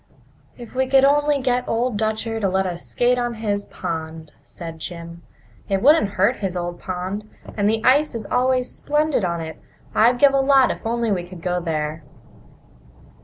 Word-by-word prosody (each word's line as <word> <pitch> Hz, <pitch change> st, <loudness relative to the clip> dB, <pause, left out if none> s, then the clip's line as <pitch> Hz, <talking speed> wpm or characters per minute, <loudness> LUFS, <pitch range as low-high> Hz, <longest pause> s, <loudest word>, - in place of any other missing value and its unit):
"If 240 Hz, -3 st, -11 dB
we 260 Hz, +1 st, 0 dB
could 270 Hz, 0 st, +5 dB
only 290 Hz, 0 st, +3 dB
get 250 Hz, -1 st, 0 dB
Old 235 Hz, +1 st, 0 dB
Dutcher 220 Hz, +1 st, -1 dB
to 200 Hz, -3 st, +1 dB
let 190 Hz, +1 st, +1 dB
us 175 Hz, -2 st, -5 dB
skate 245 Hz, +1 st, +1 dB
on 240 Hz, -1 st, -2 dB
his 205 Hz, -2 st, -2 dB
pond!" 160 Hz, -1 st, -6 dB
said 165 Hz, -2 st, -9 dB
Jim. 170 Hz, 0 st, -8 dB, 0.5 s
"It 195 Hz, +1 st, 0 dB
wouldn't 275 Hz, -8 st, +5 dB
hurt 205 Hz, +7 st, +3 dB
his 190 Hz, -3 st, -3 dB
old 175 Hz, 0 st, -4 dB
pond! 190 Hz, +3 st, -5 dB, 0.3 s
And 205 Hz, -1 st, +2 dB
the 220 Hz, +1 st, -1 dB
ice 285 Hz, +2 st, +4 dB
is 220 Hz, -3 st, -4 dB
always 255 Hz, +1 st, +1 dB
splendid 300 Hz, -5 st, 0 dB
on 170 Hz, -2 st, -1 dB
it. 160 Hz, -1 st, -8 dB, 0.3 s
I'd 240 Hz, +3 st, +4 dB
give 275 Hz, +2 st, +5 dB
a 275 Hz, -, +3 dB
lot 270 Hz, -1 st, +4 dB
if -, -, -4 dB
we -, -, -23 dB
could 225 Hz, -, 0 dB
only 225 Hz, -6 st, 0 dB
go 180 Hz, +1 st, -2 dB
there." 155 Hz, -1 st, -3 dB
215 Hz, 180 wpm, -22 LUFS, 180-250 Hz, 0.5 s, could